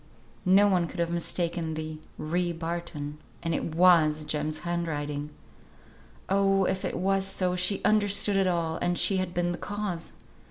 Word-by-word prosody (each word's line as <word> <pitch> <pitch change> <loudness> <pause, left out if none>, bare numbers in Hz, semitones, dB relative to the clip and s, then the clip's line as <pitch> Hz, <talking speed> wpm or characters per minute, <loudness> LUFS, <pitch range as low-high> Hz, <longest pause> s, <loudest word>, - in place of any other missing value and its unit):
no 195 +2 +6
one 180 -4 +2
could 175 - -9
have 170 0 0
mistaken 170 -1 -2
the 155 0 -5 0.2
"ry 175 +3 -1
Barton," 165 -3 -5 0.2
and 165 -1 -1
it 160 0 -3
was 160 -4 +4
Jem's 150 +1 -2
handwriting! 150 -4 -3 1.0
Oh! 195 0 +2
if 190 0 -1
it - - -2
was 195 +1 +1
so, 185 -1 0
she 180 +2 +2
understood 205 -1 +3
it 195 -1 +3
all, 170 -2 0
and 175 0 -1
she 195 - +4
had 185 -1 -2
been 175 0 0
the 175 - -5
cause! 205 -5 -4
175 Hz, 160 wpm, -27 LUFS, 160-190 Hz, 1.0 s, no